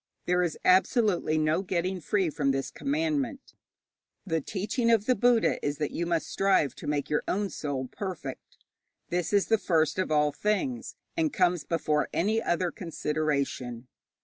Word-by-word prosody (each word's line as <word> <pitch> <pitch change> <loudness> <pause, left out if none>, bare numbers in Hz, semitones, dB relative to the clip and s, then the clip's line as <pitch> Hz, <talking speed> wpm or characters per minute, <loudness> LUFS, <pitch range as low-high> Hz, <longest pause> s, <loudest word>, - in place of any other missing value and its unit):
There 180 0 +2
is 175 -3 -1
absolutely 185 -3 +3
no 155 +3 +2
getting 185 0 -2
free 195 +3 +1
of 145 -2 0
this 135 0 -2
commandment. 290 -1 -2 0.7
The 165 -4 0
teaching 210 - -1
of 225 -3 +4
the 255 - +4
Buddha 240 0 +2
is 145 0 -1
that 150 - -2
you 170 - -2
must 170 -2 0
strive 190 -9 +2
to - - -8
make 145 -1 -1
your 150 - +2
own 200 0 -1
soul 140 -3 -3
perfect. 160 -6 -7 0.5
This 175 -1 -1
is 200 -1 +3
the 225 -1 +2
first 160 -2 +1
of 185 - 0
all 150 -1 +3
things, 240 - -2 0.2
and 320 -2 +1
comes 180 - +2
before 155 -3 0
any 220 +5 +2
other 175 -2 0
consideration. 145 -7 -2
180 Hz, 160 wpm, -28 LUFS, 150-210 Hz, 0.7 s, of